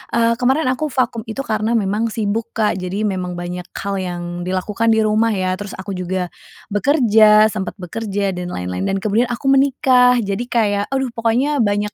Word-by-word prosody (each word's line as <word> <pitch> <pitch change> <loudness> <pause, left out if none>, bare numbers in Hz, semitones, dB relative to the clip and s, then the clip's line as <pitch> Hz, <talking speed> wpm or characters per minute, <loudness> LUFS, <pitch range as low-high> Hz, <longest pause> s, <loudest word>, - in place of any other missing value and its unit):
Eee, 230 0 +3
kemarin 265 +5 +2
aku 300 +4 -2
vakum 250 -3 -1
itu 245 +5 -4
karena 220 +2 0
memang 210 +2 0
sibuk 220 0 -2
Kak, 210 -4 +1
jadi 190 +4 -3
memang 185 -3 -2
banyak 175 0 -6
hal 200 0 -3
yang 175 -1 -4 0.2
dilakukan 200 +5 -1
di 220 - +3
rumah 215 +2 +2
ya, 185 -3 0
terus 205 -1 -7
aku 190 +2 -6
juga 180 -1 -3 0.4
bekerja, 215 -3 +5
sempat 190 -3 -4
bekerja 200 +1 -3
dan 180 0 -5
lain-lain, 90 - -3
dan 195 - 0
kemudian 220 +4 +2
aku 240 +2 -5
menikah. 260 -2 +4
Jadi 200 +4 -3
kayak, 205 -4 +1
aduh 265 -2 -1
pokoknya 245 +6 +1
banyak 205 -1 0
215 Hz, 175 wpm, -19 LUFS, 190-235 Hz, 0.4 s, bekerja